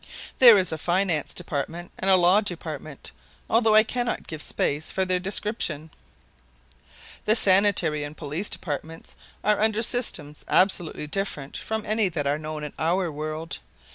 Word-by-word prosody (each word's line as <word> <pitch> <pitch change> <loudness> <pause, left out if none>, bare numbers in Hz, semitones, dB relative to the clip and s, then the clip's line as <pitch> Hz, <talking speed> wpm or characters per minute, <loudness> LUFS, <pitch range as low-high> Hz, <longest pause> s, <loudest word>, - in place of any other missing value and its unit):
There 235 -5 +10
is 185 -3 +1
a 160 - -4
Finance 175 -2 0
Department 170 +1 -5
and 195 - 0
a 190 - +7
Law 180 +3 +4
Department, 155 - -6 0.4
although 225 -1 +3
I 215 - +8
cannot 240 +2 -2
give 155 -2 -7
space 145 +1 -2
for 190 - 0
their 185 -1 0
description. 180 -5 -3 1.3
The 215 - +4
Sanitary 185 -7 +3
and 145 +1 -8
Police 155 +7 -3
Departments 160 +1 -6 0.3
are 210 0 +2
under 220 +1 +2
systems 165 - -1
absolutely 180 -5 +2
different 150 -4 -4
from 220 -1 -3
any 215 -2 +1
that 155 -4 -3
are 145 +2 0
known 155 0 -6
in 150 - -6
our 175 +2 0
world. 155 +2 -5
175 Hz, 150 wpm, -25 LUFS, 155-205 Hz, 1.3 s, There